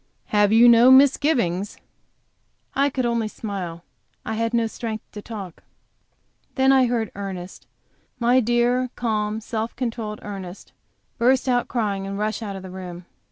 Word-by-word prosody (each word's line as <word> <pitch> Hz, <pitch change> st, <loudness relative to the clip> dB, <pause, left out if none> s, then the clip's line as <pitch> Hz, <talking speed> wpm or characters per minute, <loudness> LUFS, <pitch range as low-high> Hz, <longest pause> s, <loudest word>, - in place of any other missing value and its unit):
"Have 210 Hz, -1 st, +3 dB
you 230 Hz, +2 st, +7 dB
no 235 Hz, +1 st, +7 dB
misgivings?" 260 Hz, -, +3 dB, 1.0 s
I 280 Hz, +1 st, +2 dB
could 255 Hz, -2 st, -2 dB
only 235 Hz, -2 st, 0 dB
smile; 185 Hz, -6 st, -6 dB, 0.4 s
I 220 Hz, -, -3 dB
had 230 Hz, +1 st, -1 dB
no 235 Hz, -1 st, +1 dB
strength 220 Hz, -1 st, -5 dB
to 210 Hz, -, -8 dB
talk. 200 Hz, -6 st, -8 dB, 0.9 s
Then 265 Hz, 0 st, +4 dB
I 260 Hz, -2 st, +5 dB
heard 230 Hz, -3 st, -1 dB
Ernest 190 Hz, -2 st, -7 dB, 0.5 s
my 245 Hz, +1 st, +3 dB
dear, 240 Hz, +1 st, +1 dB
calm, 215 Hz, -2 st, -1 dB
self 225 Hz, +1 st, -4 dB
controlled 225 Hz, -4 st, -4 dB
Ernest 195 Hz, -2 st, -8 dB, 0.5 s
burst 255 Hz, +3 st, +3 dB
out 245 Hz, -1 st, +1 dB
crying 200 Hz, -5 st, -2 dB
and 195 Hz, 0 st, -4 dB
rush 215 Hz, +1 st, -2 dB
out 205 Hz, -3 st, -5 dB
of 190 Hz, -, -8 dB
the 185 Hz, -, -9 dB
room. 180 Hz, -1 st, -8 dB
220 Hz, 150 wpm, -23 LUFS, 200-245 Hz, 1.0 s, you